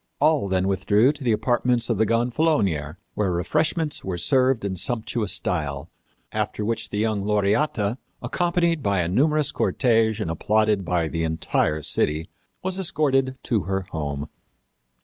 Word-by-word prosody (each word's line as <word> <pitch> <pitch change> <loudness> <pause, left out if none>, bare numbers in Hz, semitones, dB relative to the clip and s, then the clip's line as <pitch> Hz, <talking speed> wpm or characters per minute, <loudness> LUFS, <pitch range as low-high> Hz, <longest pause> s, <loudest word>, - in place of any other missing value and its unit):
All 150 -6 +3
then 95 0 +1
withdrew 100 +6 +3
to 145 - -10
the 120 - +2
apartments 120 +2 +1
of 115 -4 -1
the 110 - +3
gonfalonier, 115 - +1 0.2
where 100 -3 0
refreshments 150 - 0
were 95 -2 -3
served 130 - +2
in 95 -2 -2
sumptuous 110 0 -1
style, 70 -2 -2 0.4
after 105 - -2
which 115 +1 -2
the 105 - -4
young 105 -2 0
Laureata, 105 +3 +1 0.2
accompanied 170 -2 0
by 100 -5 +1
a 85 - -1
numerous 150 - +2
cortege 115 -3 +1
and 95 -7 -2
applauded 105 +4 +1
by 85 -2 0
the 80 +1 -3
entire 80 -1 0
city, 80 +6 0 0.3
was 190 0 -1
escorted 135 -8 +1
to 110 -8 0
her 95 +1 -1
home. 75 -2 -4
110 Hz, 150 wpm, -24 LUFS, 90-130 Hz, 0.4 s, All